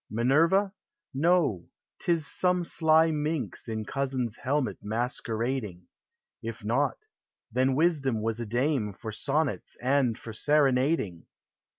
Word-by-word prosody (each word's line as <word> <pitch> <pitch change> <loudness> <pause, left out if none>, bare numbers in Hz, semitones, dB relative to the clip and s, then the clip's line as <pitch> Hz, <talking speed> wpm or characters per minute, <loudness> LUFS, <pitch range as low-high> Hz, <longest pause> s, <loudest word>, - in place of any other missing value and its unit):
Minerva? 165 - +3 0.4
No! 145 - +2 0.3
't - - 0
is 165 -3 +1
some 180 +2 +1
sly 160 -1 +3
minx 150 -2 -2
In 110 -1 -3
cousin's 130 -3 -2
helmet 140 0 -1
masquerading; 115 -2 -2 0.6
If 115 -2 -6
not 130 +6 +1 0.3
— - - -59
then 130 +1 +2
Wisdom 145 -7 +2
was 115 +1 -1
a 120 - -4
dame 120 -2 0
For 110 +3 -7
sonnets 145 +6 -1
and 130 -2 +1
for 115 - -9
serenading 135 - +1
130 Hz, 120 wpm, -28 LUFS, 115-155 Hz, 0.6 s, Minerva